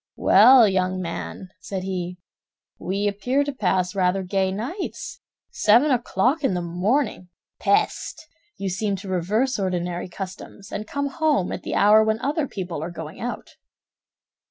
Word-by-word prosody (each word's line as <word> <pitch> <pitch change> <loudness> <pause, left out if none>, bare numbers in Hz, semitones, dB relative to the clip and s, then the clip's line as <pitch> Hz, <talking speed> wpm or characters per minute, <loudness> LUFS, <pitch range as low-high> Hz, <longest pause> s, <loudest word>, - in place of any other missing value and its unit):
"Well, 235 +3 +7
young 185 -1 0
man," 180 +1 -6
said 190 0 -5
he, 180 -1 -4 0.6
"we 195 +3 -1
appear 245 +8 0
to 285 - -3
pass 185 -7 0
rather 190 0 +1
gay 190 0 0
nights! 265 - -5 0.3
Seven 240 +8 +4
o'clock 250 +4 +1
in 195 - +1
the 180 - -1
morning! 185 +3 -1 0.3
Peste! 315 - 0 0.3
You 195 - -3
seem 195 +2 -1
to 195 +1 -9
reverse 205 +8 0
ordinary 180 -2 -2
customs, 195 +2 -9
and 210 +1 -5
come 285 +4 -2
home 285 - 0
at - - -4
the - - -4
hour 210 +2 +6
when 220 0 +1
other 290 +3 -1
people 180 -8 -5
are 165 - -4
going 160 -2 -8
out." 245 +1 -6
195 Hz, 150 wpm, -23 LUFS, 185-245 Hz, 0.6 s, Well